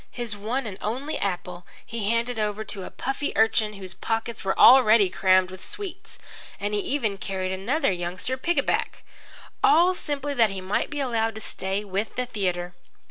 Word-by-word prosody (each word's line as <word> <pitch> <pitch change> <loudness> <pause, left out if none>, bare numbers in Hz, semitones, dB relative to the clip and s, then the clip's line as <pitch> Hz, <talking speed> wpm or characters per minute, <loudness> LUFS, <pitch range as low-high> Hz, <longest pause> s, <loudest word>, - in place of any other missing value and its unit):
His 235 -4 -5
one 230 +6 -2
and 200 -3 -6
only 260 +8 -3
apple 180 -2 -3 0.2
he 220 -3 -3
handed 230 0 0
over 210 0 -1
to 195 -2 -6
a - - -7
puffy 270 +2 -3
urchin 220 -1 +3
whose 190 -3 -7
pockets 225 +4 -3
were 190 0 -1
already 230 -6 +7
crammed 185 -1 +3
with 185 0 -10
sweets, 395 -1 -7 0.4
and 205 +1 -2
he 210 - +1
even 215 -4 -1
carried 190 -1 -3
another 200 +10 0
youngster 180 +7 -3
pickaback 340 +7 -1 0.6
all 370 -3 +6
simply 290 -4 -3
that 230 -5 +4
he 195 -1 -5
might 185 +2 -1
be 295 - -4
allowed 225 -4 0
to 220 - -7
stay 195 +1 -3
with 200 +2 -3
the 250 - -1
theatre. 180 -6 -2
215 Hz, 175 wpm, -25 LUFS, 190-250 Hz, 0.6 s, already